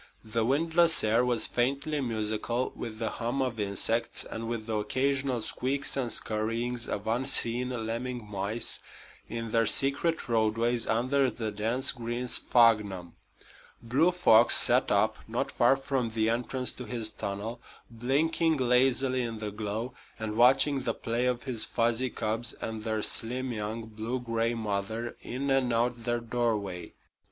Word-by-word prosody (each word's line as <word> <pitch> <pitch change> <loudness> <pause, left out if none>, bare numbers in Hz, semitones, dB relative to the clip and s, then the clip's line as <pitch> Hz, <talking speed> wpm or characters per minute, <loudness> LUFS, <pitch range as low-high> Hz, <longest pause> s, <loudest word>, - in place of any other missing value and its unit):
The 110 +1 -1
windless 165 +6 +3
air 110 +3 +3
was 125 -2 +1
faintly 140 +4 -1
musical 115 +1 -2
with 110 -2 -6
the 110 -1 -2
hum 120 +4 -3
of 125 -4 -1
insects 105 +3 +1
and 115 0 -6
with 115 -2 -4
the 110 -1 -2
occasional 130 +2 0
squeaks 135 +2 -1
and 125 -4 -1
scurryings 115 +2 -1
of 100 - -4
unseen 120 +1 +1 0.2
lemming 120 +1 -4
mice 105 +3 -3 0.5
in 115 -1 -5
their 115 -1 +2
secret 140 +8 +2
roadways 115 +1 +1
under 130 +4 +2
the 110 -2 -4
dense 115 +6 +1
green 120 0 -4
sphagnum. 105 -8 +2 0.7
Blue 135 +9 +3
Fox 120 -10 +6
sat - - +4
up, - - +2
not - - -2
far - - +4
from 135 -3 -2
the 110 0 +1
entrance 125 +2 -1
to 125 - -8
his 110 -2 -2
tunnel, 105 +4 -5 0.3
blinking 150 +7 +1
lazily 130 +1 +2
in 115 -2 -4
the 105 -1 -5
glow 110 +4 -4 0.2
and 110 -1 -4
watching 135 +4 +4
the - - -2
play 120 +1 -1
of 125 -1 -1
his 120 -5 -2
fuzzy 120 +3 0
cubs 110 +1 -1
and 110 -1 -6
their 110 -1 -2
slim, 125 +3 0
young, 110 +1 -4
blue 110 +3 -4
gray 115 -1 -1
mother 110 +2 -3
in 135 +3 -3
and 135 -2 +2
out 120 0 0
their 120 -1 0
doorway. 110 -7 -2
120 Hz, 150 wpm, -29 LUFS, 110-130 Hz, 0.7 s, Fox